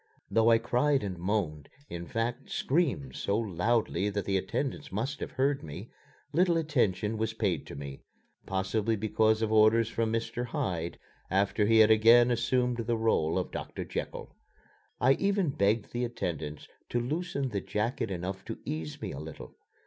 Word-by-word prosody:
Though 115 Hz, 0 st, +4 dB
I 115 Hz, -, +7 dB
cried 135 Hz, +4 st, +1 dB
and 95 Hz, -3 st, -3 dB
moaned, 85 Hz, -6 st, -2 dB, 0.2 s
in 85 Hz, -4 st, -6 dB
fact, 120 Hz, +3 st, -2 dB
screamed 130 Hz, -, 0 dB
so 100 Hz, -, 0 dB
loudly 105 Hz, -1 st, 0 dB
that 100 Hz, -2 st, -3 dB
the 100 Hz, -, 0 dB
attendants 95 Hz, +8 st, -2 dB
must 125 Hz, +9 st, -2 dB
have -, -, -4 dB
heard 140 Hz, +1 st, +1 dB
me, 75 Hz, -2 st, -8 dB, 0.4 s
little 175 Hz, +1 st, +3 dB
attention 110 Hz, -, +1 dB
was 110 Hz, -1 st, -1 dB
paid -, -, -1 dB
to -, -, -8 dB
me 70 Hz, -1 st, -7 dB, 0.5 s
possibly 100 Hz, +4 st, 0 dB
because 110 Hz, +1 st, +2 dB
of 110 Hz, -, 0 dB
orders 110 Hz, +1 st, +5 dB
from 115 Hz, -1 st, -1 dB
Mr. 115 Hz, +1 st, -2 dB
Hyde 85 Hz, -6 st, -2 dB, 0.3 s
after 100 Hz, +2 st, +2 dB
he 115 Hz, 0 st, +5 dB
had 110 Hz, 0 st, +7 dB
again 115 Hz, +3 st, +6 dB
assumed 125 Hz, +1 st, +1 dB
the 115 Hz, 0 st, -1 dB
role 95 Hz, -8 st, +1 dB
of -, -, -2 dB
Doctor -, -, -5 dB
Jekyll. -, -, -5 dB, 0.6 s
I 130 Hz, +2 st, +5 dB
even 195 Hz, -1 st, +1 dB
begged 105 Hz, -2 st, +1 dB
the 120 Hz, +1 st, -1 dB
attendants 85 Hz, -11 st, -4 dB, 0.2 s
to 120 Hz, -, 0 dB
loosen 140 Hz, +1 st, -2 dB
the 100 Hz, -4 st, -2 dB
jacket 110 Hz, +1 st, -2 dB
enough 95 Hz, +1 st, -4 dB
to -, -, -5 dB
ease 80 Hz, -1 st, -4 dB
me -, -, -3 dB
a 70 Hz, -, -6 dB
little. 80 Hz, 0 st, -9 dB
110 Hz, 165 wpm, -30 LUFS, 95-120 Hz, 0.6 s, I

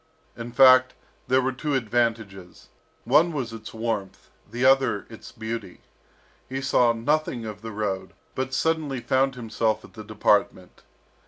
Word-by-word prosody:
In 120 Hz, 0 st, -7 dB
fact, 130 Hz, 0 st, +6 dB, 0.3 s
there 130 Hz, 0 st, +3 dB
were 130 Hz, -, 0 dB
two 140 Hz, +3 st, -3 dB
advantages, 110 Hz, -6 st, -2 dB, 0.3 s
one 170 Hz, +2 st, +4 dB
was 130 Hz, -7 st, -4 dB
its 110 Hz, -1 st, -9 dB
warmth, 110 Hz, -4 st, -4 dB, 0.2 s
the 120 Hz, +4 st, -2 dB
other 135 Hz, -5 st, +3 dB
its 110 Hz, -, -11 dB
beauty. 110 Hz, -4 st, -7 dB, 0.7 s
He 135 Hz, +1 st, -3 dB
saw 130 Hz, -3 st, +3 dB
nothing 120 Hz, 0 st, -1 dB
of 105 Hz, -1 st, -7 dB
the 110 Hz, 0 st, -7 dB
road, 100 Hz, -3 st, -4 dB, 0.2 s
but 130 Hz, 0 st, -3 dB
suddenly 155 Hz, -3 st, -1 dB
found 130 Hz, +2 st, +1 dB
himself 115 Hz, -2 st, -2 dB
at -, -, -17 dB
the 110 Hz, -, -9 dB
department. 105 Hz, -3 st, 0 dB
120 Hz, 145 wpm, -25 LUFS, 110-130 Hz, 0.7 s, fact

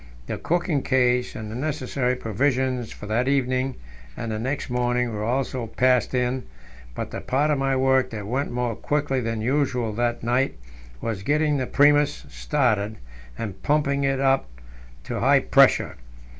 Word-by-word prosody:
The -, -, -4 dB
cooking 175 Hz, -4 st, 0 dB
case 125 Hz, -2 st, +1 dB
and 110 Hz, -1 st, -6 dB
the -, -, -6 dB
necessary 130 Hz, -2 st, -1 dB
provisions 125 Hz, +1 st, -1 dB
for -, -, -9 dB
that 115 Hz, +4 st, 0 dB
evening 130 Hz, -1 st, +1 dB, 0.4 s
and 115 Hz, -, -4 dB
the 110 Hz, -, -2 dB
next 135 Hz, +5 st, -2 dB
morning 125 Hz, -1 st, 0 dB
were 105 Hz, 0 st, -3 dB
also 125 Hz, 0 st, -1 dB
passed 125 Hz, +2 st, +2 dB
in; 125 Hz, +1 st, 0 dB, 0.5 s
but -, -, -5 dB
the -, -, -5 dB
part 145 Hz, +4 st, +1 dB
of 145 Hz, -, +1 dB
my 135 Hz, 0 st, +1 dB
work 130 Hz, 0 st, +3 dB
that 105 Hz, -3 st, -6 dB
went 130 Hz, +7 st, -1 dB
more 120 Hz, -2 st, -2 dB
quickly 145 Hz, 0 st, -1 dB
than 115 Hz, -2 st, -2 dB
usual 125 Hz, -3 st, 0 dB
that 120 Hz, +1 st, -1 dB
night 125 Hz, +3 st, +1 dB, 0.5 s
was 110 Hz, -4 st, -3 dB
getting 150 Hz, +6 st, +1 dB
the 130 Hz, -2 st, -2 dB
Primus 145 Hz, 0 st, +3 dB
started, 110 Hz, -8 st, 0 dB, 0.4 s
and 100 Hz, -4 st, -6 dB
pumping 145 Hz, -2 st, +1 dB
it 135 Hz, -1 st, +1 dB
up 135 Hz, -, +2 dB, 0.5 s
to -, -, -4 dB
high -, -, +5 dB
pressure. -, -, +4 dB
130 Hz, 160 wpm, -24 LUFS, 120-135 Hz, 0.5 s, high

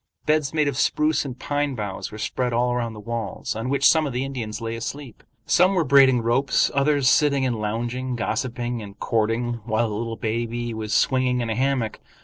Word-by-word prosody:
Beds 150 Hz, -2 st, +1 dB
made 155 Hz, -2 st, +1 dB
of 140 Hz, -, -2 dB
spruce 150 Hz, +3 st, +1 dB
and 130 Hz, -2 st, -6 dB
pine 145 Hz, -1 st, -1 dB
boughs 105 Hz, -4 st, -5 dB
were 105 Hz, -, -8 dB
spread 125 Hz, +3 st, -2 dB
all 120 Hz, +1 st, +1 dB
around 120 Hz, -2 st, -2 dB
the 105 Hz, -, -10 dB
walls, 115 Hz, 0 st, -4 dB
on 115 Hz, +3 st, -3 dB
which 140 Hz, 0 st, +4 dB
some 160 Hz, -2 st, +4 dB
of 135 Hz, -, -5 dB
the 125 Hz, +2 st, -1 dB
Indians 115 Hz, -5 st, -5 dB
lay 115 Hz, 0 st, -4 dB
asleep; 120 Hz, +1 st, -7 dB, 0.2 s
some 185 Hz, +2 st, +4 dB
were 175 Hz, -, +3 dB
braiding 130 Hz, -3 st, +5 dB
ropes, 120 Hz, +4 st, +2 dB
others 140 Hz, -1 st, +2 dB
sitting 140 Hz, -2 st, +3 dB
and 125 Hz, -2 st, 0 dB
lounging, 120 Hz, +4 st, -2 dB
gossiping 120 Hz, 0 st, -2 dB
and 100 Hz, -1 st, -11 dB
courting, 115 Hz, +2 st, 0 dB
while 110 Hz, +1 st, 0 dB
a 110 Hz, -, -3 dB
little 115 Hz, +1 st, -4 dB
baby 115 Hz, +1 st, -2 dB
was 110 Hz, -1 st, -5 dB
swinging 130 Hz, +2 st, +2 dB
in 115 Hz, -2 st, -2 dB
a -, -, -1 dB
hammock. 130 Hz, -3 st, 0 dB
120 Hz, 200 wpm, -23 LUFS, 115-135 Hz, 0.2 s, braiding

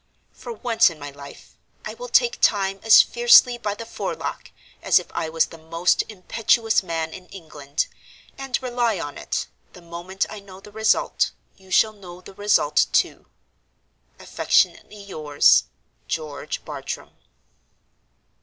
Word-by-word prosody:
For -, -, -9 dB
once 245 Hz, -, +2 dB
in 165 Hz, -, -11 dB
my 145 Hz, -1 st, -8 dB
life, 140 Hz, 0 st, -14 dB, 0.3 s
I -, -, -5 dB
will -, -, -8 dB
take 480 Hz, 0 st, +2 dB
Time 195 Hz, -2 st, +2 dB
as 225 Hz, -, +8 dB
fiercely 240 Hz, +1 st, +5 dB
by 205 Hz, -2 st, -3 dB
the 230 Hz, -, -8 dB
forelock 230 Hz, -, -5 dB, 0.3 s
as -, -, +4 dB
if -, -, -2 dB
I 160 Hz, -, -3 dB
was 160 Hz, 0 st, +2 dB
the 165 Hz, -, -13 dB
most 165 Hz, +2 st, +1 dB
impetuous 220 Hz, +3 st, +1 dB
man 165 Hz, -3 st, -4 dB
in 185 Hz, -1 st, -11 dB
England; 155 Hz, -6 st, -5 dB, 0.5 s
and, 270 Hz, -2 st, -3 dB
rely 240 Hz, -5 st, 0 dB
on 145 Hz, -3 st, -6 dB
it, -, -, -3 dB, 0.3 s
the 180 Hz, -, -14 dB
moment 175 Hz, +3 st, -4 dB
I 215 Hz, -, -9 dB
know 195 Hz, -1 st, -14 dB
the 210 Hz, +1 st, -14 dB
result, 220 Hz, +1 st, +1 dB, 0.2 s
you 190 Hz, -1 st, -21 dB
shall 215 Hz, +3 st, +3 dB
know 180 Hz, -4 st, -12 dB
the 185 Hz, -, -14 dB
result, 205 Hz, +2 st, +2 dB
too. -, -, 0 dB, 0.9 s
"Affectionately 210 Hz, -1 st, 0 dB
yours, 155 Hz, -, +3 dB, 0.4 s
"GEORGE 155 Hz, -3 st, -5 dB
BARTRAM." -, -, -7 dB
195 Hz, 145 wpm, -23 LUFS, 165-225 Hz, 0.9 s, as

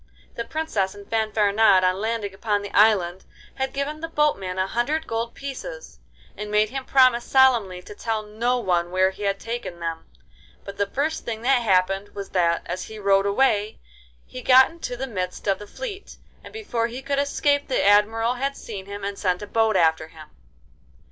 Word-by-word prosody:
The 235 Hz, -, -5 dB
Princess 220 Hz, -12 st, -2 dB
and 200 Hz, 0 st, -12 dB
Fanfaronade 215 Hz, -3 st, +3 dB
on 185 Hz, +1 st, +1 dB
landing 220 Hz, -3 st, -2 dB
upon 205 Hz, +1 st, -1 dB
the 200 Hz, -, -7 dB
island 190 Hz, -4 st, +3 dB, 0.3 s
had 265 Hz, 0 st, -3 dB
given 280 Hz, +2 st, -3 dB
the 330 Hz, -, -3 dB
boatman 290 Hz, -, 0 dB
a 185 Hz, -, +1 dB
hundred 285 Hz, +10 st, -1 dB
gold 230 Hz, +1 st, -3 dB
pieces, 385 Hz, -, -8 dB, 0.4 s
and 210 Hz, 0 st, -6 dB
made 210 Hz, +1 st, +2 dB
him 265 Hz, 0 st, -5 dB
promise 255 Hz, -3 st, +4 dB
solemnly 235 Hz, -9 st, +3 dB
to -, -, -10 dB
tell 220 Hz, +1 st, -3 dB
no 230 Hz, +4 st, -1 dB
one 175 Hz, -6 st, 0 dB
where 185 Hz, +1 st, +2 dB
he 190 Hz, -, -14 dB
had 200 Hz, -1 st, -1 dB
taken 230 Hz, -7 st, -5 dB
them; 165 Hz, -1 st, -5 dB, 0.6 s
but 200 Hz, 0 st, -9 dB
the 200 Hz, -, +1 dB
first 295 Hz, +8 st, -2 dB
thing 225 Hz, -1 st, -5 dB
that 260 Hz, 0 st, +3 dB
happened 195 Hz, -1 st, +1 dB
was 200 Hz, -1 st, -6 dB
that, 170 Hz, -2 st, +1 dB
as 180 Hz, +2 st, -4 dB
he 220 Hz, -, -10 dB
rowed 200 Hz, -1 st, +2 dB
away, 210 Hz, -1 st, +1 dB, 0.5 s
he 255 Hz, -, -9 dB
got 260 Hz, +3 st, +6 dB
into 325 Hz, -7 st, -6 dB
the 265 Hz, -, -3 dB
midst 185 Hz, -7 st, -5 dB
of 195 Hz, -, +1 dB
the 210 Hz, -, -10 dB
fleet, 425 Hz, -, -8 dB, 0.3 s
and -, -, -11 dB
before 245 Hz, -, -2 dB
he 250 Hz, +3 st, -8 dB
could 280 Hz, +1 st, -1 dB
escape 285 Hz, 0 st, +1 dB
the 260 Hz, -, 0 dB
Admiral 220 Hz, +3 st, +3 dB
had 275 Hz, +2 st, -3 dB
seen 200 Hz, -4 st, -8 dB
him 200 Hz, 0 st, -7 dB
and 200 Hz, 0 st, -4 dB
sent 180 Hz, +1 st, 0 dB
a -, -, -4 dB
boat 220 Hz, 0 st, +1 dB
after 160 Hz, -1 st, +2 dB
him. 155 Hz, -1 st, -14 dB
215 Hz, 190 wpm, -23 LUFS, 195-255 Hz, 0.6 s, got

